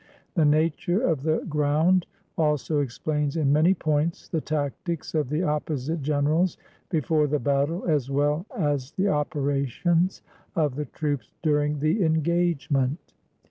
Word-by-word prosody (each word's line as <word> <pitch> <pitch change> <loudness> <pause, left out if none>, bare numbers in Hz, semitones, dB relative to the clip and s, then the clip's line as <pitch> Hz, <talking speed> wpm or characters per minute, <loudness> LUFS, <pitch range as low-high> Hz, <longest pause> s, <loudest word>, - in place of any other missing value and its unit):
The 165 -4 +3
nature 160 +4 +2
of 165 - +1
the 155 +2 0
ground 155 +4 +2 0.3
also 150 -1 +1
explains 145 +3 -1
in 145 -3 +2
many 165 +6 +4
points 155 0 -1
the 160 - -2
tactics 155 +2 -3
of 150 -5 0
the 150 +5 0
opposite 150 0 -2
generals 150 +5 +1 0.3
before 155 -3 +1
the 150 +1 +1
battle, 140 +6 0
as 145 -6 +1
well 145 +6 0
as 145 -5 -1
the 200 0 +1
opera 145 -3 0
tions 175 +8 0 0.3
of 150 -5 +1
the 150 +3 -3
troops 145 0 -3
during 150 -2 +1
the 160 +7 +2
engagement. 160 -3 0
150 Hz, 140 wpm, -25 LUFS, 145-165 Hz, 0.3 s, many